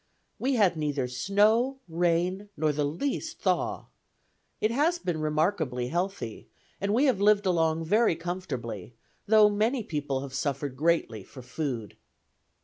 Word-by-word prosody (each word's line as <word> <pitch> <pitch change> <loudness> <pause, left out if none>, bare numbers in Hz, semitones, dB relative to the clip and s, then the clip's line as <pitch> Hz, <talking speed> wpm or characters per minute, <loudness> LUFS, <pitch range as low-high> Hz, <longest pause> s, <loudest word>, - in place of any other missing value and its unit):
"We 265 +1 +1
had 195 -7 +3
neither 145 -4 -1
snow, 210 - +2
rain, 175 +4 0
nor 155 -1 +2
the 150 0 -1
least 170 - -3
thaw. - - 0 0.7
It 215 - +1
has 305 +8 +2
been 175 - -3
remarkably 155 -5 0
healthy, 175 - -3 0.3
and 200 +1 0
we 250 +7 +3
have 245 -8 +2
lived 205 0 +4
along 165 -3 +1
very 215 +1 +3
comfortably, 135 - -5 0.3
though 215 0 +7
many 220 +4 +1
people 145 -6 -2
have 135 -1 -7
suffered 140 0 -2
greatly 150 -7 +1
for 130 +5 -12
food." 125 -5 -4
170 Hz, 140 wpm, -28 LUFS, 140-205 Hz, 0.7 s, though